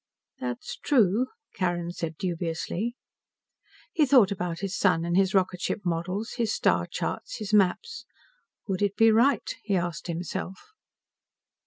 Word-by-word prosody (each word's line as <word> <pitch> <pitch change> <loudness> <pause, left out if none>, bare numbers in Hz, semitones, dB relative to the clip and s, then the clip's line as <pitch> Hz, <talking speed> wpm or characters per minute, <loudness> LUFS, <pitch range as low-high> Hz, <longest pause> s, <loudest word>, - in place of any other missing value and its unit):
"That's 125 -1 -5
true," 235 -3 +3 0.3
Carrin 175 -2 -1
said 165 -2 -5
dubiously. 175 +5 -2 1.0
He 305 -3 +3
thought 245 -8 +6
about 180 -3 -3
his 195 -1 -2
son 175 -4 +2
and 170 0 0
his 190 0 +3
rocket 185 -1 +1
ship 210 - -1
models, 180 +6 -2
his 230 -3 +1
star - - +2
charts, - - -4
his 215 -1 -5
maps. 210 - +2 0.6
Would 190 -2 -2
it 205 -1 +1
be 225 0 +6
right? 240 +6 +3
he 205 -3 -1
asked 175 -1 -2
himself. 175 +2 -4
190 Hz, 140 wpm, -27 LUFS, 175-220 Hz, 1.0 s, thought